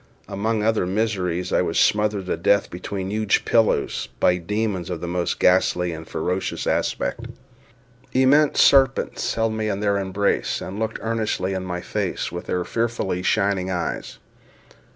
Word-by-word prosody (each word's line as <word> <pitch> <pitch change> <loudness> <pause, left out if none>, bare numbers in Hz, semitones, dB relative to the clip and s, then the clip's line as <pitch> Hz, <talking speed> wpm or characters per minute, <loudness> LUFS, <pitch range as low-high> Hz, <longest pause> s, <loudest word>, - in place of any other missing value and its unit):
Among 110 +2 -1
other 110 -4 +1
miseries 95 -4 -1
I - - +4
was 85 -2 -1
smothered 105 -2 +2
to - - -1
death 100 0 +2
between 95 +2 -5
huge 105 -1 +1
pillows, 115 -2 +1
by 90 - +3
demons 100 0 -2
of 90 -2 -3
the 85 - -5
most 90 0 -1
ghastly 90 -1 +3
and 80 -1 -8
ferocious 90 +4 -2
aspect. - - -1 0.8
Immense 140 +3 +4
serpents 135 -1 +3
held 115 -1 0
me 110 -1 -2
in 100 -1 -2
their 100 -1 +1
embrace, 100 +1 0
and 95 +3 -6
looked 110 0 -2
earnestly 110 -4 -1
in 95 -1 -3
my 90 -1 -4
face - - -3
with 85 +1 -7
their 90 -1 -1
fearfully 115 -6 -1
shining 95 0 +1
eyes. 90 -2 -3
100 Hz, 150 wpm, -23 LUFS, 90-110 Hz, 0.8 s, I